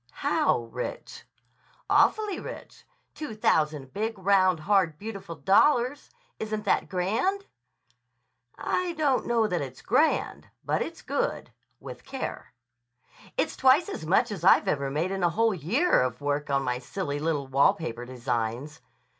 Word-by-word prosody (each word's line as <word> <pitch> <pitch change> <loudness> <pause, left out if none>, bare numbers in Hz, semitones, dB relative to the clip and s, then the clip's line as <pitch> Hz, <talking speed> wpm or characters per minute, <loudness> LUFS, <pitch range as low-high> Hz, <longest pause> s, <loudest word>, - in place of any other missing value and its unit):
"How 120 - +2
rich?" 125 +1 -6 0.6
"Awfully 425 -4 +2
rich. - - -10 0.3
Two 300 -8 -6
thousand 150 -9 0
big, 220 +1 -2
round, 185 -3 +3
hard, 185 -4 +2
beautiful 195 -4 -7
dollars. 245 - +2 0.3
Isn't 215 -1 -4
that - - +1
grand!" 225 - 0 1.1
"I 360 -1 -1
don't 295 -5 +1
know 235 -2 +2
that 180 -6 -1
it's 130 -2 -8
grand. - - +1 0.2
But - - 0
it's - - -5
good—with - - -5
care." - - -6 0.9
"It's - - 0
twice 265 +6 +4
as - - -6
much 175 +6 +2
as 190 -5 -6
I've 185 - +5
ever 140 -2 0
made 160 +7 -1
in 195 0 -3
a 175 - +3
whole 225 +5 +2
year 205 - +2
of 125 -1 -2
work 145 +1 -2
on 135 -1 +1
my 125 -1 -1
silly 145 +2 -4
little 150 -2 -1
wall 135 +1 +3
paper 120 -7 -6
designs." 125 +3 -3
180 Hz, 140 wpm, -27 LUFS, 140-225 Hz, 1.1 s, I've